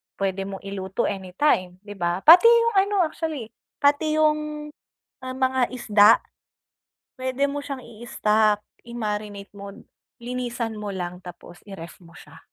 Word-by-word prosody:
puwede 195 0 -2
mong 195 -1 -8
iluto 195 +2 -4
anytime, 185 -1 0
di 205 - -11
ba? 175 +2 -1
Pati 350 +8 +9
'yung 465 -1 +5
ano 395 -1 +2
actually 310 -7 -4 0.2
pati 290 +2 +2
'yung, 300 -1 0 0.5
ah, 255 - -5
mga 260 -1 +1
isda. 215 -4 +5 1.1
Puwede 260 +2 -1
mo 285 0 -5
siyang 275 -2 -6
i-stock, 215 -2 0 0.2
i-marinate 210 -3 -5
mo, 200 0 -9 0.5
linisan 240 -2 -4
mo 210 -1 -5
lang, 180 -1 -5
tapos 175 0 -11
i-ref 185 -5 -10
mo 165 - -17
siya. - - -15
225 Hz, 135 wpm, -24 LUFS, 195-285 Hz, 1.1 s, Pati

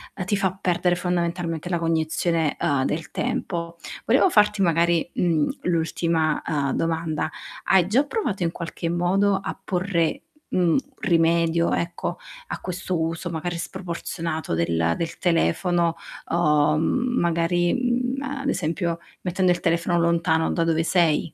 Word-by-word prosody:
uhm, 185 - -4
ti 205 - +1
fa 190 -1 -1
perdere 180 -1 +1
fondamentalmente 175 -1 -2
la 175 -2 0
cognizione, 165 -1 0
uhm, 135 -2 +1
del 160 +3 -3
tempo. 170 -9 -3 0.3
Volevo 380 - +4
farti 210 -5 +3
magari, 170 0 +2
mhmm, 165 -4 +1
l'ultima, 165 -2 0
uhm, 145 -4 0
domanda: 160 -1 -1 0.4
hai 185 -3 +5
già 240 +8 +3
provato 285 - -2
in 165 - 0
qualche 170 0 -5
modo 185 +4 +2
a 195 - -4
porre, 180 -3 0 0.3
mhmm, 175 -3 +3 0.2
rimedio, 170 -2 +2
ecco, 170 +1 -2 0.3
a - - -5
questo 180 -1 -3
uso 165 +2 -2
magari 170 +1 -3
sproporzionato 170 - -4
del 85 0 +1
del 170 0 -4
telefono 170 - +1 0.3
o, 150 -2 +3
mhmm, 250 +9 +1
magari, 170 +1 +1
mhmm, 250 +1 0 0.2
ad 275 - -1
esempio 170 - -1 0.2
mettendo 185 0 +1
il 175 - +1
telefono 170 +1 +1
lontano 165 -1 +2
da 165 - +1
dove 165 0 +2
sei? 165 -3 +2
170 Hz, 140 wpm, -24 LUFS, 165-180 Hz, 0.4 s, hai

